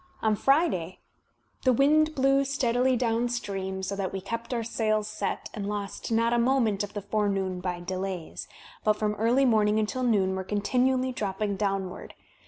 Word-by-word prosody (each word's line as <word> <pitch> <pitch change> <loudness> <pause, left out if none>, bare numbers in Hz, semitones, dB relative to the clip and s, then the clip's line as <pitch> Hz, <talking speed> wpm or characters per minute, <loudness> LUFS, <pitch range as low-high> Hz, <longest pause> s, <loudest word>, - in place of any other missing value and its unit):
On 220 -1 +3
Friday 240 - +1 0.7
"the 255 - +5
wind 310 +5 +3
blew 275 +1 +3
steadily 255 -2 +1
downstream, 225 -5 -1
so 200 - -2
that 195 -2 -2
we 195 - -3
kept 230 +5 -5
our 235 -2 -1
sails 215 -2 0
set, - - -4
and 205 -2 -4
lost 205 +1 -4
not 230 +1 +2
a 240 - +3
moment 235 -5 +2
of 205 - -7
the 205 - -4
forenoon 195 -3 -1
by 180 -1 -3
delays, 185 -1 -4 0.4
but 215 - +4
from 210 0 -1
early 235 +6 +2
morning 215 -3 +3
until 220 +4 -1
noon 200 -6 +2
were 190 - -3
coritinually 255 +6 +1
dropping 205 -3 -2
downward. 195 -2 -3
215 Hz, 165 wpm, -27 LUFS, 195-245 Hz, 0.7 s, the